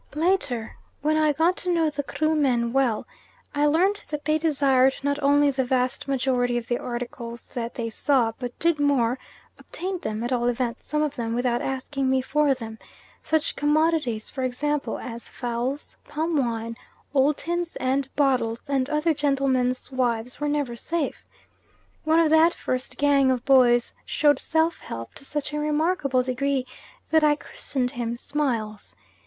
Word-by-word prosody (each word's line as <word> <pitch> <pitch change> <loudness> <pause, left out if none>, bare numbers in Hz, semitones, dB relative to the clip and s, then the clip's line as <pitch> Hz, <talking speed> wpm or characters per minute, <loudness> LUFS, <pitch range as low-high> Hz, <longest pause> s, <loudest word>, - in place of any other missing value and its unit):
Later, 300 -9 0 0.3
when 305 +1 +2
I 310 -1 +3
got 325 +5 +2
to 360 - -2
know 325 -3 +2
the 290 0 -2
Krumen 275 -6 +1
well, 260 -5 +1 0.5
I 295 0 +2
learnt 375 +7 +2
that 300 -1 -5
they 310 0 +2
desired 270 -4 +3
not 285 +1 0
only 285 0 +4
the 265 -1 0
vast 255 +1 0
majority 250 -2 +1
of 240 -1 -4
the 240 - 0
articles 240 -1 -6
that 235 -1 -5
they 230 -2 -3
saw, 250 -2 +2
but 245 -1 -5
did 335 -2 +1
more 260 -4 +2 0.4
obtained 370 0 -5
them 215 +1 -3
at 240 +2 -1
all 240 -1 +1
events 245 0 -2
some 300 0 0
of 295 -1 -2
them, 230 -1 -2
without 245 0 0
asking 270 0 -2
me 265 0 +3
for 285 +1 +2
them; 225 -3 -8 0.4
such 315 0 0
commodities, 295 -6 +1
for 265 - -6
example, 290 +3 -1
as 235 -1 -7
fowls, 245 +4 -4
palm 320 +2 -2
wine, 230 -4 -1 0.4
old 280 +1 +3
tins 345 0 -3
and 265 +1 0
bottles, 250 -5 +1
and 275 -1 0
other 305 +2 +2
gentlemen's 270 -3 0
wives 245 -2 -1
were 295 - -1
never 290 -5 -1
safe. 325 +5 -3 0.8
One 315 +1 +4
of 320 -2 +3
that 320 +2 +5
first 255 0 -3
gang 280 -2 +4
of 255 -1 0
boys 245 -3 +5
showed 295 -1 +2
self 320 +1 +1
help 115 0 -7
to - - -12
such 295 0 -3
a 300 - -1
remarkable 300 -3 +1
degree 260 +1 -1 0.5
that 315 -1 +4
I 300 -1 +5
christened 255 -4 -2
him 240 -2 -3
Smiles. 230 - -3
270 Hz, 165 wpm, -25 LUFS, 245-300 Hz, 0.8 s, that